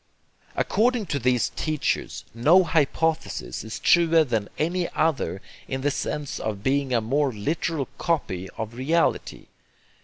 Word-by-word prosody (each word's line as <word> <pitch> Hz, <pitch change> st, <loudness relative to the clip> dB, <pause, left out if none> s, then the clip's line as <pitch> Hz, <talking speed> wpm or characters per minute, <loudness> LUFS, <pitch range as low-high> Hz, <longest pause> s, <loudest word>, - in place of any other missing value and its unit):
According 235 Hz, 0 st, +1 dB
to 140 Hz, -, 0 dB
these 125 Hz, -1 st, +2 dB
teachers 155 Hz, -2 st, -2 dB
no 155 Hz, +11 st, +5 dB
hypothesis 160 Hz, -, 0 dB
is 110 Hz, 0 st, -6 dB
truer 165 Hz, -1 st, +4 dB
than 110 Hz, -7 st, -2 dB
any 175 Hz, +3 st, 0 dB
other 140 Hz, -, 0 dB, 0.2 s
in 130 Hz, 0 st, -3 dB
the 145 Hz, +2 st, +1 dB
sense 150 Hz, 0 st, -3 dB
of 105 Hz, -2 st, -4 dB
being 135 Hz, 0 st, +1 dB
a 120 Hz, -2 st, +2 dB
more 135 Hz, +5 st, +1 dB
literal 145 Hz, +6 st, -2 dB
copy 95 Hz, -, -1 dB
of 110 Hz, 0 st, -4 dB
reality. 150 Hz, +8 st, 0 dB
140 Hz, 130 wpm, -25 LUFS, 120-165 Hz, 0.2 s, no